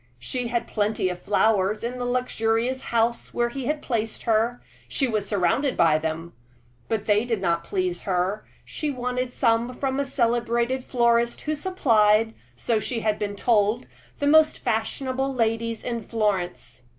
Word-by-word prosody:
She 235 - -3
had 235 0 -1
plenty 210 -3 0
of 180 0 -6
flowers 205 +1 +2
in 250 +2 -3
the 245 - -2
luxurious 245 0 0
house 235 0 0
where 240 0 +1
he 255 0 -5
had 300 0 -1
placed 225 -3 -2
her 230 +1 +1 0.3
she 270 - 0
was 215 -4 -1
surrounded 210 +8 +1
by 155 -2 +4
them 160 +2 -4 0.6
but 220 -2 -1
they 210 0 +3
did 235 -3 -1
not 170 -2 0
please 185 -1 -2
her; 190 +3 -1 0.2
she 305 - -3
wanted 250 -1 -2
some 235 -1 +1
from 270 0 -1
a 280 - +1
celebrated 240 0 0
florist 235 -1 +2
who 310 0 -2
supplied 225 - +3 0.2
so 220 - 0
she 230 +1 -3
had 215 -1 0
been 205 -1 -3
told 215 +2 +2 0.3
the 285 - -2
most 310 +1 +5
fashionable 260 +4 -1
ladies 230 -1 -1
in 235 -2 -3
Florence. 185 - -2
230 Hz, 160 wpm, -25 LUFS, 210-250 Hz, 0.6 s, most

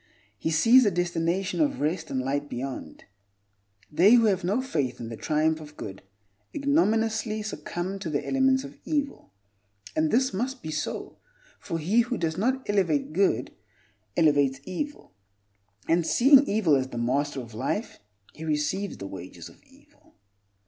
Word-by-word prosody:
He 130 - -3
sees 230 +11 +6
a 210 - +4
destination 175 - -1
of 285 -3 +1
rest 155 +5 -1
and 130 - -1
light 140 +3 -2
beyond. 130 +2 -6 0.9
They 180 +9 +6
who 230 -2 +5
have 195 -5 +1
no 200 +7 +1
faith 145 - -2
in 115 - -6
the 115 - -6
triumph 155 +5 0
of 150 0 -12
good 95 -2 -7 0.5
ignominiously 225 -7 +1
succumb 195 -2 -4
to 185 -4 -4
the 145 -2 -2
elements 265 0 +2
of - - -11
evil. 285 - -3 0.6
And 155 0 +2
this 260 +3 +2
must 250 +6 -3
be 155 - -4
so; 155 - -4 0.4
for 165 - -4
he 180 +9 +2
who 245 +1 +1
does 160 -3 -1
not 255 +7 -1
elevate 170 -8 +1
good, 195 +3 +1 0.7
elevates 145 -4 +3
evil, 290 - -6 0.7
and, 170 +1 +3
seeing 275 - +6
evil 200 -8 +3
as 130 -1 0
the 120 - -8
master 135 +4 0
of 120 -3 -9
life, 135 - -3 0.3
he 160 - -10
receives 155 +6 -1
the - - -7
wages 95 -2 -9
of - - -20
evil. - - -25
175 Hz, 155 wpm, -26 LUFS, 145-225 Hz, 0.9 s, sees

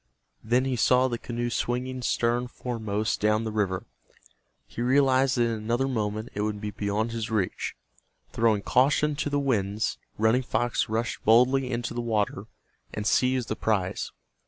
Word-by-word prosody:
Then 125 +4 +2
he 130 -1 0
saw 125 +2 +4
the 120 -2 -3
canoe 120 0 -3
swinging 125 +2 -2
stern 120 0 0
foremost 110 -4 -2
down 105 +1 +2
the 110 - -3
river. 100 -4 -1 0.8
He - - -7
realized 130 +1 +3
that 120 - +4
in 115 - +1
another 115 +4 -1
moment 110 -2 -2
it 105 - -3
would 105 -1 -2
be 105 0 -4
beyond 105 +2 -1
his 115 -1 -3
reach. 105 -5 -2 0.6
Throwing 110 -3 +2
caution 145 +3 +3
to 145 - -1
the 145 - 0
winds, 110 -6 0 0.2
Running 110 +4 +3
Fox 120 -3 -1
rushed 115 +1 -2
boldly 125 +4 +4
into 120 -1 -3
the 120 - -2
water 105 -3 -1 0.5
and 105 - -4
seized 125 +1 +2
the 110 - -2
prize. 100 -5 -1
115 Hz, 160 wpm, -27 LUFS, 110-125 Hz, 0.8 s, saw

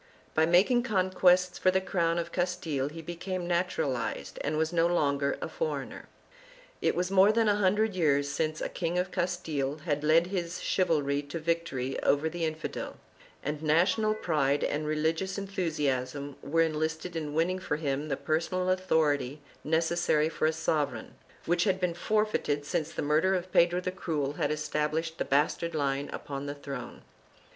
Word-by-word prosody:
By 160 0 +3
making 195 +9 +4
conquests 185 -4 +3
for 185 - +4
the 190 +1 +3
crown 170 -3 0
of 170 0 -3
Castile 175 -6 -1
he 165 +2 -9
became 175 +2 -4
natural 170 -6 0
ized 120 - -4
and 150 +1 -1
was 160 +2 0
no 170 0 +3
longer 140 -5 +1
a - - -2
foreigner. 485 -1 -4 0.7
It - - +2
was 180 +1 -1
more 195 +2 +6
than 225 0 +2
a 205 -1 +3
hundred 210 +2 +2
years 145 -5 +2
since 155 +2 -2
a - - -2
King 170 0 -2
of 180 +1 0
Castile 160 -6 -1
had 150 -3 -1
led 160 +3 +5
his 175 -2 -2
chivalry 145 -6 +1
to 145 +3 -6
victory 165 -5 -2
over 150 +3 +2
the 170 0 -2
infidel, 155 0 -4 0.5
and 150 +1 -3
national 180 +8 +3
pride 145 -8 +1
and 150 +1 -1
religious 160 +5 0
enthusiasm 145 -8 -2
were 165 +4 +1
enlisted 160 +2 -2
in 150 -2 -3
winning 180 +3 +1
for 165 - -2
him 145 -1 -2
the 135 - -1
personal 180 +4 0
authority 155 -7 +1 0.2
necessary 160 -1 +2
for 155 - 0
a - - +3
sovereign, 155 -2 -1 0.3
which 175 +1 +2
had 190 -2 +1
been 180 -2 0
forfeited 175 -6 0
since 155 +1 -1
the - - -3
murder 155 +6 +3
of 185 0 -4
Pedro 175 +1 +4
the 185 0 -3
Cruel 150 -6 -2
had 145 -1 -1
established 155 +2 -2
the - - 0
bastard 155 +4 +1
line 140 -1 -1
upon 140 -1 -5
the 145 - -4
throne. 140 -4 -7
165 Hz, 170 wpm, -29 LUFS, 150-180 Hz, 0.7 s, more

